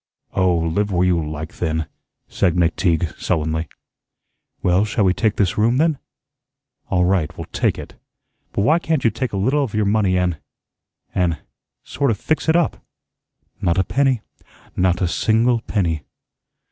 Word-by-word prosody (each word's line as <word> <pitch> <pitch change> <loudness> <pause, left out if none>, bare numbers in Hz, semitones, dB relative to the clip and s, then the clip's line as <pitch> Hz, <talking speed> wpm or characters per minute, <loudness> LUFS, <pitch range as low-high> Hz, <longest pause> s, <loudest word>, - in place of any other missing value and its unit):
"Oh, 90 -2 +2
live 85 +6 0
where 90 0 +2
you 85 -3 +2
like, 75 +1 -6
then," 80 -2 -1 0.4
said 90 -4 +1
McTeague, 85 -1 +1
sullenly. 80 -1 -1 1.0
"Well, 90 +2 +3
shall 110 0 0
we 95 -1 +4
take 110 +1 0
this 95 -1 0
room 115 +4 +3
then?" 155 -1 +2 0.9
"All 90 0 +2
right, 90 -4 0
we'll 85 - -5
take - - +1
it. - - -9 0.6
But 100 - 0
why 155 +8 +4
can't 160 -5 -1
you 115 - +3
take 120 +3 -3
a 100 - -3
little 135 +9 +2
of 115 -6 -4
your 105 -1 +2
money 100 -3 +2
an' 90 -3 0 0.8
an' 90 -4 +1 0.5
sort 140 0 -1
of 110 - +1
fix 155 +7 -1
it 160 - +4
up?" 170 -4 +1 0.8
"Not 85 +1 +1
a 95 - +4
penny, 135 0 +1 0.5
not 90 0 +1
a - - +2
single 115 +7 +2
penny." 85 -9 -1
95 Hz, 160 wpm, -20 LUFS, 85-115 Hz, 1.0 s, we